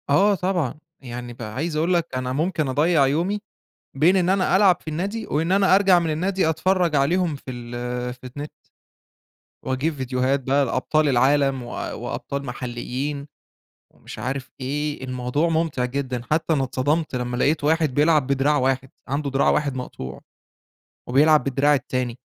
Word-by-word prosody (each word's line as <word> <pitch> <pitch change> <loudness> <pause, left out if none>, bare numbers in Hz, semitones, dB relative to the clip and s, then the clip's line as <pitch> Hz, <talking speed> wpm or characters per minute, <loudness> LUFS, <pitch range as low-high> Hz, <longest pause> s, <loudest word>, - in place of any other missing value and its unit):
آه، 200 +8 +4
طبعًا 180 -7 -1 0.3
يعني 120 -1 -7
بقى 110 -3 -8
عايز 155 +4 -2
أقول 165 +4 +1
لك 170 -2 +1
أنا 130 0 -2
ممكن 155 +1 0
أضيّع 145 +2 +3
يومي، 175 +9 0 0.6
بين 160 +8 +4
إن 180 -2 +2
أنا 190 0 +3
ألعب 190 -3 +5
في - - -10
النادي 200 +8 -3
وإن 165 +4 0
أنا 195 -1 +4
أرجَع 195 -2 +5
من 170 -2 -1
النادي 185 +3 0
أتفرّج 175 0 +1
عليهم 165 +3 +1
في 135 - -10
ال 125 0 -4
في 125 0 -13
النت. 145 +1 -6 1.1
وأجيب 130 +5 -1
فيديوهات 130 0 0
بقى 135 +2 +1
لأبطال 145 +5 +1
العالم 135 +1 +2
و 120 - -9
وأبطال 140 0 -5
محليين، 130 +3 -4 0.6
ومش - - -12
عارف 130 +4 -4
إيه 145 +2 -3
الموضوع 130 +5 -1
ممتع 160 -6 0
جدًا، 125 -1 -3
حتّى 160 +1 +1
أنا 135 -3 +1
اتصدمت 145 +5 -1
لمّا 125 0 -3
لقيت 145 +3 +1
واحد 155 -3 +2
بيلعب 150 -1 +3
بدراع 140 +2 +2
واحد، 130 0 0 0.2
عندُه 140 +1 -1
دراع 135 +1 +3
واحد 145 -3 0
مقطوع، 65 - -7 0.9
وبيلعب 150 +4 +5
بالدراع 140 +2 +2
التاني. 130 -3 -2
140 Hz, 155 wpm, -23 LUFS, 130-165 Hz, 1.1 s, ألعب